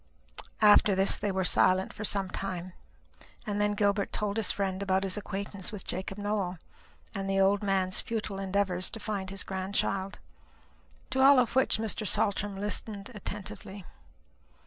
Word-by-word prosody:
After 205 -1 +6
this 190 +1 +3
they 205 -1 -2
were 190 0 0
silent 185 +1 +3
for 215 - -7
some 200 -2 0
time, 185 -2 -5 0.7
and 205 -1 -1
then 210 0 +1
Gilbert 200 0 +1
told 210 0 -2
his 220 -4 +4
friend 190 -1 -2
about 190 -1 +1
his 190 -1 0
acquaintance 200 -2 -3
with 210 -3 -8
Jacob 190 +2 -4
Nowell, 205 -3 -2 0.6
and 195 0 -3
the 195 0 +1
old 195 +1 +3
man's 190 -2 +1
futile 215 -3 -4
endeavours 190 -1 0
to 225 - -6
find 205 -3 -4
his 195 -1 -2
grandchild; 190 +1 -2 0.9
to 265 0 +1
all 275 +1 +8
of 250 -2 +2
which 265 - +3
Mr. 220 -1 -1
Saltram 200 0 0
listened 205 +1 -3
attentively. 205 -2 -7
200 Hz, 155 wpm, -29 LUFS, 190-210 Hz, 0.9 s, all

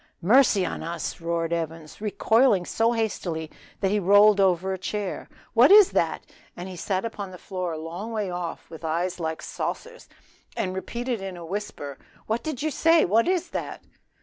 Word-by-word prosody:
"Mercy 210 -2 +5
on - - -4
us," 170 +1 -5
roared 165 0 -1
Evans, 165 0 -5
recoiling 220 -1 +3
so 225 +5 +1
hastily 175 -8 -3 0.3
that 195 -1 +1
he 210 - +2
rolled 205 +2 +6
over 190 0 +2
a - - -3
chair, 200 +1 -4 0.2
"what - - +6
is 410 -1 +8
that?" - - 0 0.3
and 175 +1 -6
he 185 - -8
sat 185 +3 -2
upon 205 -4 -5
the 185 - -10
floor 180 -2 -4
a - - -5
long 170 +8 -6
way 215 -3 -2
off, 175 -1 -5
with 160 0 -11
eyes 175 +3 -1
like 160 -1 -3
saucers, 485 0 -5 0.5
and 185 - -1
repeated 235 +4 -3
in 190 -2 -6
a 170 - -8
whisper, 165 -7 -5 0.3
"what 230 +5 -2
is 315 - +2
that?" - - -5
190 Hz, 165 wpm, -25 LUFS, 170-225 Hz, 0.5 s, is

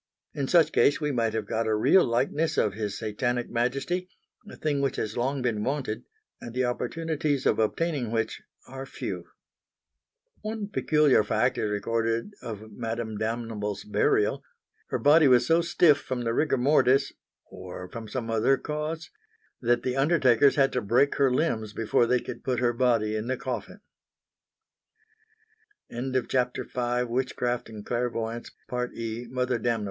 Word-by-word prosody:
In 140 -2 -2
such 165 -1 +4
case 145 - +3
we 150 -2 -1
might 115 -4 0
have 110 -2 -1
got 110 +2 -1
a 110 - +2
real 175 - +5
likeness 135 +7 0
of 105 - +2
His 105 -1 -3
Satanic 120 +3 -2
Majesty 135 +10 -1 0.4
a - - -10
thing 145 -2 -1
which 140 - 0
has 110 0 -3
long 130 +2 -1
been 110 -4 0
wanted 135 -4 -2 0.4
and 120 0 -8
the 130 0 +1
opportunities 150 +2 -1
of - - +3
obtaining 135 +3 0
which 115 -1 -2 0.3
are 135 +1 -7
few. - - -5 1.2
One 215 -1 -4
peculiar 150 - +3
fact 125 +4 +1
is 105 - 0
recorded 115 - -1
of 110 -1 -7
Madame 115 -1 -4
Damnable's 110 -2 -3
burial; 415 - +1 0.5
her - - 0
body 150 +1 +6
was 125 -2 +5
so 165 +4 +4
stiff 165 -3 +4
from 125 -2 -4
the 115 -1 0
rigor 150 +2 +1
mortis 135 0 +3 0.3
or 90 0 -9
from 110 +3 -8
some 115 +1 -4
other 115 +5 +3
cause 150 +3 -4 0.5
that 120 0 +2
the 130 0 -1
undertakers 135 -3 +4
had 135 -2 +3
to 125 - 0
break 120 +7 +3
her 135 -2 +3
limbs 110 -7 0
before 115 +1 +2
they 125 +1 +3
could 120 -1 -8
put 130 -2 -1
her 120 -1 +2
body 115 -3 +1
in 110 +2 -3
the 130 0 -1
coffin. 130 - -5
125 Hz, 140 wpm, -27 LUFS, 115-145 Hz, 1.2 s, body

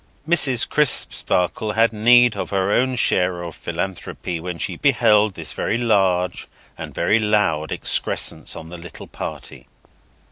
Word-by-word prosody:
Mrs. 140 -8 +4
Crisparkle 105 - +1
had 115 +1 +1
need 120 +2 +4
of - - -5
her 95 0 -1
own 130 +3 0
share 90 -6 0
of 85 - -8
philanthropy 85 0 -6
when 90 +1 -6
she - - -3
beheld 105 -2 +2
this - - -2
very 110 - -2
large 95 -6 0 0.3
and - - -9
very 115 - 0
loud 105 -8 0
excrescence - - +1
on 80 - -10
the 90 0 -10
little 85 0 -11
party. - - -8
100 Hz, 140 wpm, -20 LUFS, 90-115 Hz, 0.3 s, Mrs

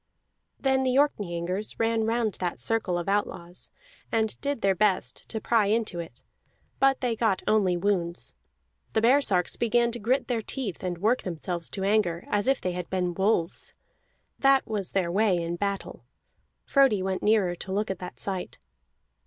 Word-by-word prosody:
Then 265 -1 +2
the 255 -1 +1
Orkneyingers 190 -7 0
ran 225 -1 +1
round 225 -2 0
that 180 -2 -2
circle 225 -6 0
of 175 - -4
outlaws, 185 -3 -2 0.4
and 220 -2 0
did 280 -4 -2
their 195 -1 +3
best 195 0 0
to 220 - -3
pry 220 -1 +2
into 215 -4 0
it; 135 -6 -8 0.6
but 270 0 +3
they 245 -3 0
got 220 -4 +1
only 195 -5 +3
wounds. 175 -2 -1 0.6
The 220 - +2
baresarks 230 -7 +3
began 235 +1 +2
to 240 - -5
grit 245 +6 +1
their 235 -3 0
teeth 225 -4 -4
and 180 -1 -2
work 220 +8 +2
themselves 170 -1 -4
to 195 - -4
anger 195 -4 +1
as 205 +2 +1
if 270 0 +3
they 180 - -2
had 180 -1 -5
been 180 -2 -1
wolves; 190 -2 0 0.6
that 275 -1 +4
was 205 -4 -3
their 180 -3 +1
way 200 -1 +3
in 170 0 -2
battle. 200 +2 -3 0.6
Frodi 265 -9 +4
went 190 -1 -2
nearer 210 -4 +3
to 190 - -6
look 205 +1 0
at 190 - -5
that 180 - -8
sight. 190 -2 -3
205 Hz, 170 wpm, -27 LUFS, 180-230 Hz, 0.6 s, that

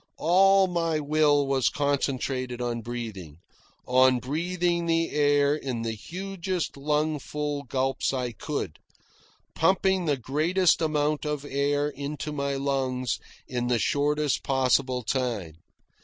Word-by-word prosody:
All 195 +4 +5
my 165 -3 0
will 145 -1 +3
was 135 -2 +2
concentrated 135 -3 -1
on 120 -1 -2
breathing 110 -10 -6 0.5
on 130 0 +4
breathing 170 +6 -1
the 165 0 +1
air 145 -1 +3
in 130 -6 -4
the 115 - -1
hugest 185 - -4
lung 150 +2 0
full 150 +1 -3
gulps 135 +1 0
I 125 -2 -2
could, 115 - -5 0.7
pumping 190 +1 +2
the 145 -3 +1
greatest 160 +10 +2
amount 150 -1 0
of 150 -2 -3
air 145 +1 0
into 150 +1 -5
my 140 -1 -2
lungs 130 -3 -1 0.3
in 120 -1 -2
the 120 -1 +2
shortest 145 +4 +1
possible 130 -1 +1
time. 110 - -2
145 Hz, 125 wpm, -26 LUFS, 130-155 Hz, 0.7 s, All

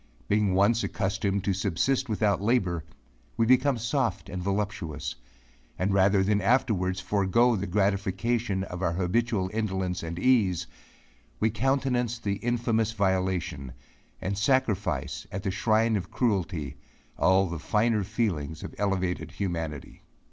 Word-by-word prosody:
Being 105 -2 +2
once 105 +4 +3
accustomed 100 -1 -1
to 100 - +1
subsist 100 +8 0
without 105 -2 +1
labour, 95 -7 +1 0.5
we 115 - +3
become 130 +2 +4
soft 120 +2 -1
and 90 - -4
voluptuous; 100 -5 -2 0.6
and 95 +2 0
rather 100 0 +4
than 105 +1 +2
afterwards 95 -5 +1
forego 100 +6 +2
the 100 -1 -3
gratification 100 +2 0
of 90 -1 -6
our 85 -2 +1
habitual 95 +2 0
indolence 95 -5 -1
and 85 0 -5
ease, 105 -7 +2 0.7
we 110 - +2
countenance 125 0 0
the 100 -3 -2
infamous 115 -2 0
violation, 95 - -1 0.5
and 100 +1 -3
sacrifice 100 - 0
at 95 +1 -4
the 100 - -1
shrine 110 +3 +2
of 90 -3 -3
cruelty, 90 - -1 0.4
all 95 +3 +4
the 85 -3 -4
finer 105 +3 +1
feelings 90 - -2
of - - -7
elevated 95 -3 -1
humanity. 80 -7 -4
100 Hz, 130 wpm, -27 LUFS, 90-115 Hz, 0.7 s, become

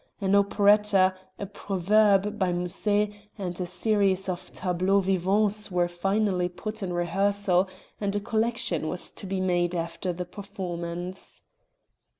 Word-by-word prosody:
An 195 -1 0
Operetta, 200 -1 +4 0.2
a 200 - -4
Proverbe 200 +1 +2
by 185 -2 +1
Musset, 205 +4 +1 0.3
and 185 -2 -4
a 180 - -2
series 195 0 +2
of 180 -1 -5
Tableaux 185 +2 +1
Vivants 200 +3 +1
were 175 -2 +1
finally 185 +1 0
put 215 +5 -6
in 190 -2 -3
rehearsal 190 +2 +1 0.3
and 200 -1 -2
a - - +1
collection 220 -7 -1
was 180 - -2
to 195 - -6
be 190 0 -2
made 175 -1 0
after 170 +2 -3
the 180 +1 -5
performance. 180 -2 -7
190 Hz, 135 wpm, -26 LUFS, 180-205 Hz, 0.3 s, Operetta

